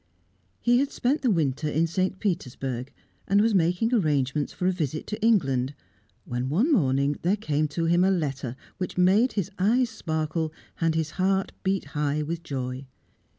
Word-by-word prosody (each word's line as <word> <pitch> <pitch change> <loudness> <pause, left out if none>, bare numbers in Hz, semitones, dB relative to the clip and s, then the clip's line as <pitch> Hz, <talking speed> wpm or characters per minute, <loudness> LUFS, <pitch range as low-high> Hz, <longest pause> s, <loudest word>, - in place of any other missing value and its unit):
He 245 +1 +3
had 275 +1 +1
spent 270 +5 0
the 260 - +2
winter 155 - +1
in 160 +3 +2
St. 185 +3 -1
Petersburg, 135 - -3 0.4
and 200 +1 +4
was 220 +1 +3
making 180 +6 +2
arrangements 150 - +1
for 180 - -4
a 185 - +4
visit 155 -4 -3
to 215 +1 -5
England, 135 - +2 0.5
when 125 +1 -3
one 215 - +2
morning 140 - +2
there 180 +4 +2
came 155 -7 0
to 165 +3 -2
him 175 +2 +3
a 190 - +4
letter 140 -9 -1 0.2
which 180 -1 -4
made 195 +8 +4
his 200 -2 -2
eyes 230 +5 +3
sparkle 160 -5 -2 0.3
and 165 -1 +1
his 160 -1 -1
heart 190 0 +1
beat 195 0 0
high 150 0 0
with 165 +2 -4
joy. 130 -3 -5
165 Hz, 170 wpm, -26 LUFS, 145-195 Hz, 0.5 s, and